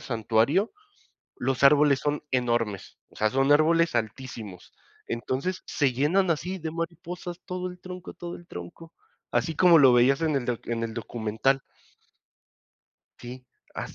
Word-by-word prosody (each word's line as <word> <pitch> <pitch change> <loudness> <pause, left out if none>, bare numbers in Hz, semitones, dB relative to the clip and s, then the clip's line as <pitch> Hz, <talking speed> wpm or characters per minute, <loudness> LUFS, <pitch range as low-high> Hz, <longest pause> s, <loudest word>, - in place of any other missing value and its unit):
santuario, 115 - +1 0.7
los 130 +2 -1
árboles 145 0 +6
son 145 0 -2
enormes, 120 -5 -1
o - - -19
sea, 110 0 +2
son 135 +3 +2
árboles 165 +2 +4
altísimos, 110 -4 -5 0.4
entonces, 130 +11 -3
se 135 -4 +1
llenan 170 +8 +2
así 180 +4 -3
de 160 -3 -5
mariposas, 170 +1 -6
todo 180 0 -4
el 180 0 -12
tronco 180 0 -9
todo 175 0 -7
el 175 - -14
tronco, 90 - -10 0.4
así 160 -3 0
como 175 -1 +6
lo 130 -3 +7
veías 130 +4 +4
en 155 -3 +1
el 130 - -1
doc 120 -2 -4
en 115 -1 -2
el 115 -1 -4
documental. 115 +4 -1 1.6
Sí, 125 +1 -9 0.3
así. - - -6
140 Hz, 145 wpm, -26 LUFS, 120-170 Hz, 1.6 s, lo